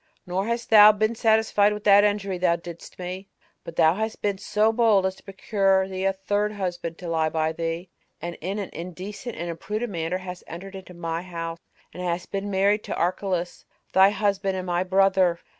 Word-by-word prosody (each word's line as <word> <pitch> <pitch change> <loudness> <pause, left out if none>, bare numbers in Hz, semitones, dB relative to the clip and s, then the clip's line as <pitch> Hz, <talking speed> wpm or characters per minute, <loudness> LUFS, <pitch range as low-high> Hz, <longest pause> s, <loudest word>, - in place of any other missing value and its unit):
Nor 185 +3 -2
hast 235 0 -3
thou 210 -1 +10
been 215 +2 0
satisfied 220 -2 +3
with 210 0 -7
that 205 -1 +7
injury 200 -3 0
thou 175 -2 +3
didst 170 0 -10
me, 185 +2 -6 0.3
but 165 - -9
thou 160 +1 +5
hast 220 +3 -3
been 200 -2 -1
so 215 +3 +1
bold 220 -5 +4
as 190 - 0
to - - -19
procure 195 -1 +1
thee 190 0 -4
a 195 - +4
third 205 +2 -1
husband 175 -4 -4
to 180 - -8
lie 160 -1 +1
by 160 0 0
thee, 165 +2 -4 0.3
and 175 0 -5
in 190 +5 -3
an 200 -3 -5
indecent 190 +7 -7
and 175 - -5
imprudent 210 +7 -4
manner 165 0 -2
hast 180 -1 -8
entered 190 +4 -8
into 185 -2 -10
my 165 -1 -3
house, 165 -2 -6 0.3
and 180 - -7
hast 175 0 -3
been 200 0 -3
married 200 +2 +2
to - - -3
Archelaus, 180 0 -2 0.3
thy 190 +1 +7
husband 195 -2 0
and 185 - -4
my 175 0 0
brother. 190 -2 +3
190 Hz, 195 wpm, -25 LUFS, 175-205 Hz, 0.3 s, thou